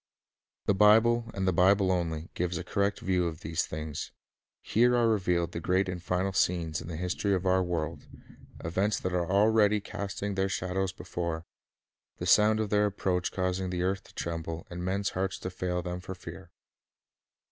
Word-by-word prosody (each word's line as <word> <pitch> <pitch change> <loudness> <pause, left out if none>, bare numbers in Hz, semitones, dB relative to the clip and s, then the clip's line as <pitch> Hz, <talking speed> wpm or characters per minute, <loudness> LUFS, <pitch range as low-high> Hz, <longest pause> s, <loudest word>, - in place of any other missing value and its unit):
The - - +3
Bible, 115 +3 +5
and 95 -1 -1
the 95 - +3
Bible 95 +2 +4
only, 85 -3 -2
gives 90 0 -1
a 90 - -4
correct 100 +2 0
view 90 -2 +1
of 80 -2 -6
these 80 +1 -1
things. 75 -1 -5 0.5
Here 120 +2 +3
are 120 -1 +3
revealed 90 -6 +1
the 85 - -4
great 95 +3 +2
final 90 -1 -4
The - - -15
Final 90 +3 -1
scenes 85 -4 +1
in - - -9
the 85 - -5
history 90 +4 0
of 95 0 -3
our 95 0 +3
world, 85 -4 -3 0.6
events 95 +6 0
that 95 - -2
already 100 +4 +3
Scenes. 100 - -13
r - - -6
are 100 - -1
casting 100 +1 -4
their 95 0 0
shadows 95 0 -1
before, 85 -3 -4 0.7
the - - -4
sound 110 +1 +5
of 110 -2 -2
their 105 0 +4
approach 90 -2 -1
causing 90 0 -1
the 90 -1 -1
earth 95 +1 0
to - - -18
tremble, 85 -1 -4
and 90 0 -5
men's 100 +2 -1
hearts 95 +1 -2
to 95 - -5
fail 90 -1 -2
them 90 0 -4
for 95 +1 -7
fear. 90 +1 -10
90 Hz, 190 wpm, -29 LUFS, 85-100 Hz, 0.7 s, Bible